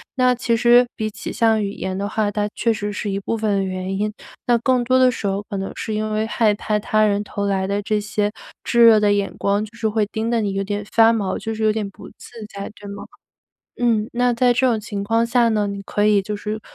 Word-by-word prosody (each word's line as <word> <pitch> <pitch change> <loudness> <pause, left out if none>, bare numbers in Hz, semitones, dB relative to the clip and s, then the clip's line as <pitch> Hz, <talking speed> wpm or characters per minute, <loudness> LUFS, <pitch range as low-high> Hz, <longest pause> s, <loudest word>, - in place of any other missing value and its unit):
那 255 -1 +3
其 235 -1 0
实， 240 +1 +6
比 215 0 -2
起 215 +1 -7
像 225 -2 +2
语 200 - -2
言 190 -1 -4
的 200 +1 -2
话， 215 -1 0
它 205 0 -1
确 230 - +1
实 205 -1 -4
是 205 - -3
一 195 - -2
部 200 - -3
分 205 -3 0
原 185 0 -3
因。 210 +1 -1 0.3
那 240 - +4
更 250 +1 +2
多 255 +2 +3
的 255 - +6
时 225 - -6
候 195 +1 -2
可 200 - -3
能 195 0 -4
是 220 - -4
因 215 0 -2
为 215 +1 0
害 225 -2 +2
怕 210 +1 -1
他 215 0 +1
人 205 0 +1
投 205 0 -4
来 190 -1 0
的 200 +1 -1
这 210 +1 0
些， 210 0 -1 0.3
炙 235 0 +4
热 225 -2 +7
的 205 -1 +3
眼 200 -1 -1
光， 200 +2 +1
就 220 +2 -16
是 220 -1 0
会 215 -1 +1
盯 220 +2 -3
得 235 -1 +1
你 200 -2 -1
有 195 0 -1
点 205 +1 -4
发 225 0 +6
毛， 205 -4 -1
就 225 0 -4
是 220 - -3
有 215 -1 +3
点 215 -2 -3
不 195 - -13
自 - - -16 0.2
在， 200 +1 -6
对 205 - -10
吗？ 200 - -7 0.7
嗯， 225 -3 +1
那 245 0 +2
在 245 +1 +3
这 260 +2 +2
种 235 -4 +2
情 205 -1 -5
况 225 +3 +1
下 235 0 +3
呢， 210 -2 +1
你 200 0 -5
可 205 +1 -1
以 210 -1 +4
就 210 +2 -5
是 215 +1 -5
215 Hz, 275 characters per minute, -21 LUFS, 205-230 Hz, 0.7 s, 热